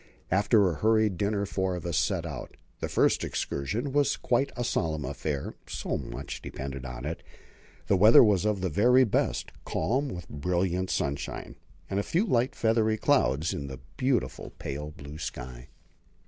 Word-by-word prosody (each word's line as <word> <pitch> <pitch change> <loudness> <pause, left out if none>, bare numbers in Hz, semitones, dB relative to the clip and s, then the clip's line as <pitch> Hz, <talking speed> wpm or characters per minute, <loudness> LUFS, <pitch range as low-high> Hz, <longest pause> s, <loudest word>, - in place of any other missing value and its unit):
After 100 +2 +4
a 80 - -5
hurried 110 0 +3
dinner 100 +1 0
four 95 -2 -1
of 90 - -6
us 85 -2 -1
set 60 -3 +1
out. - - -7 0.2
This - - -3
first - - +3
excursion 105 - -2
was 145 -1 +2
quite 135 +3 +1
a 120 - -1
solemn 80 -9 -1
affair; 70 +1 -3
so - - -3
much - - -6
depended 70 -1 -6
on 60 0 -6
it. 80 +2 -4 0.6
The 100 - +3
weather 105 +6 +8
was 105 -5 +3
of 105 -3 0
the 95 - 0
very 125 - +5
best, 115 - 0
calm 130 - 0
with 90 -8 -7
brilliant 90 +4 -1
sunshine, 70 0 -3 0.3
and 100 - -1
a - - +2
few 175 - +1
light, 125 - +1
feathery 110 -1 +2
clouds 80 - +2
in 70 -1 -4
the 65 -1 -7 0.2
beautiful, 125 - 0
pale 75 +2 -5
blue 75 0 -10
sky. - - -6
95 Hz, 165 wpm, -28 LUFS, 70-110 Hz, 0.6 s, weather